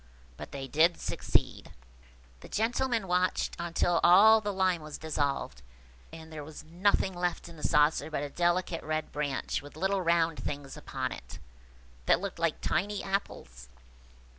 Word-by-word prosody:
But - - -9
they 135 -1 -6
did 160 +5 +3
succeed. - - -1 0.7
The - - -13
gentlemen 230 -1 0
watched 180 +1 0
on 170 -1 -5
till 175 -1 +3
all 215 +5 +7
the 205 -1 -2
lime 185 -3 +1
was 155 -1 -7
dissolved, 145 - -2 0.5
and 160 0 -11
there 150 -2 -6
was 150 +1 -10
nothing 190 +3 +1
left 175 -1 -2
in 170 - -12
the 155 - -12
saucer 150 +2 +3
but 150 -2 -2
a 145 - -4
delicate 175 0 0
red 155 0 -3
branch 145 -3 -2
with 145 +1 -13
little 190 +3 0
round 165 -2 +2
things 140 -1 -5
upon 130 -3 -4
it, - - -9 0.7
that - - +5
looked - - -5
like - - 0
tiny 200 - -1
apples. 65 - -4
165 Hz, 160 wpm, -30 LUFS, 150-185 Hz, 0.7 s, all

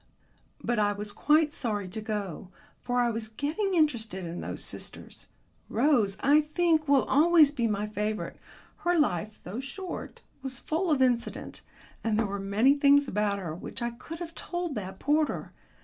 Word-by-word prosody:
But 240 -2 0
I 205 -1 +3
was 205 0 -5
quite 300 +4 +3
sorry 210 -5 -2
to 215 +4 -5
go, 205 -4 -4 0.3
for 245 0 +1
I 240 -1 +2
was 225 -1 -4
getting 310 - -1
interested 225 - +1
in 170 +1 -5
those - - -4
sisters. - - -7 0.4
Rose, 230 -7 +2
I 290 +2 +5
think, 310 0 +1
will 280 -2 +5
always 310 0 +5
be 240 -6 0
my 210 -1 -1
favourite. 210 0 -3 0.4
Her 350 0 +1
life, 215 - 0
though 200 +7 -5
short, 350 +8 -7 0.2
was 265 -1 -3
full 335 +4 -1
of 280 -4 +4
incident, 245 -2 -1 0.4
and 220 -2 +1
there 225 - +2
were 200 0 -3
many 205 +7 +3
things 285 0 +5
about 210 -2 0
her 175 -5 -4
which 205 +7 -6
I 235 - -1
could 295 +7 -9
have 330 -1 -7
told 350 -3 -4
that 190 -5 -5
porter. 300 +5 0
240 Hz, 170 wpm, -28 LUFS, 210-300 Hz, 0.4 s, I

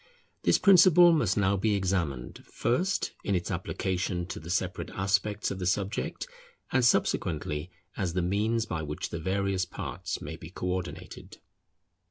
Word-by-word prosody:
This - - +4
principle 180 -2 +7
must 115 - +2
now 100 -1 +3
be 105 +2 +1
examined 90 -10 -2
first 180 +12 0
in 100 - 0
its 85 -1 -2
application 90 -1 -2
to - - -5
the 80 - -10
separate 90 +1 -2
aspects 100 +2 0
of 95 - -5
the 90 - -2
subject, 100 +1 -1 0.5
and 130 -1 +3
subsequently 80 -8 +1 0.3
as 90 -4 -2
the 90 0 0
means 110 +5 +1
by 80 -7 -3
which 75 -1 -4
the 85 - -4
various 95 +2 0
parts 90 - -5
may 80 - -7
be 80 0 -10
co 90 - -6
ordinated. 90 -1 -5
95 Hz, 155 wpm, -28 LUFS, 90-105 Hz, 0.5 s, principle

